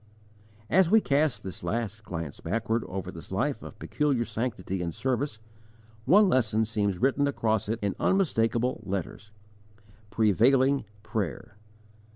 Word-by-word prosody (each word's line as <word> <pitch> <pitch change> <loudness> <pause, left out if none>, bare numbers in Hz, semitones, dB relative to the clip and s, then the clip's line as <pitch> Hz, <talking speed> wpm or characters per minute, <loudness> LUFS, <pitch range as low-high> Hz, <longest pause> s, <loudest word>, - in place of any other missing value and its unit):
As 170 - +4
we 220 +3 +6
cast 145 - +1
this 95 -2 -7
last 110 +3 -3
glance 85 -6 -6
backward 115 +1 -1
over 95 0 -5
this 80 - -10
life 130 +9 -1
of - - -10
peculiar 140 -6 0
sanctity 105 -7 -3
and 85 -2 -3
service, 130 -2 -1 0.7
one 200 +8 +6
lesson 110 - +2
seems 100 -3 -1
written 140 +5 +2
across 110 -6 0
it 115 - 0
in 100 - 0
unmistakable 125 - +1
letters: 100 +2 -5 0.8
PREVAILING 125 +6 +3 0.2
PRAYER. 100 - -4
115 Hz, 130 wpm, -28 LUFS, 100-135 Hz, 0.8 s, we